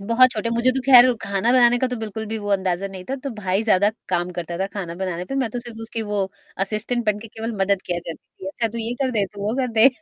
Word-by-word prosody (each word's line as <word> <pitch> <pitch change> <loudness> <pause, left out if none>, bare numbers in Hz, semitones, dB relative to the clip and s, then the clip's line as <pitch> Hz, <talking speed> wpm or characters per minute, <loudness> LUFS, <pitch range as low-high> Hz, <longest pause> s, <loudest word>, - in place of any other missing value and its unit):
बहुत 230 +5 +5
छोटे, 225 0 -2
मुझे 235 +2 +4
तो 265 - 0
ख़ैर 255 -2 +9 0.2
ख़ाना 200 +3 0
बनाने 245 -1 +5
का 260 - +1
तो 250 - -3
बिल्कुल 220 -1 -5
भी 220 +1 -3
वो 205 -1 -6
अंदाज़ा 190 -1 0
नहीं 190 -1 -9
था। 270 - 0
तो 275 - -2
भाई 195 -1 -1
ज़्यादा 205 -2 +3 0.2
काम 175 0 0
करता 170 0 -4
था 190 - 0
ख़ाना 195 -4 -6
बनाने 180 -1 -3
पे, 270 - -6
मैं 260 -4 0
तो 245 - -4
सिर्फ़ 235 -2 -10
उसकी 225 0 -3
वो 210 -1 -2 0.5
असिस्टेंट 225 +4 -2
बन 210 -1 +2
के 225 +1 -10
केवल 225 +2 -5
मदद 195 0 +2
किया 175 -1 -1
करती 165 - -12
थी, - - -5
अच्छा 230 +3 -1
तू 230 +2 -6
ये 230 +1 -3
कर 260 - +1
दे, 215 -5 +1
तू 200 +2 -12
वो 215 +3 -1
कर 255 - 0
दे। 225 +3 +8
215 Hz, 275 wpm, -22 LUFS, 195-235 Hz, 0.5 s, ख़ैर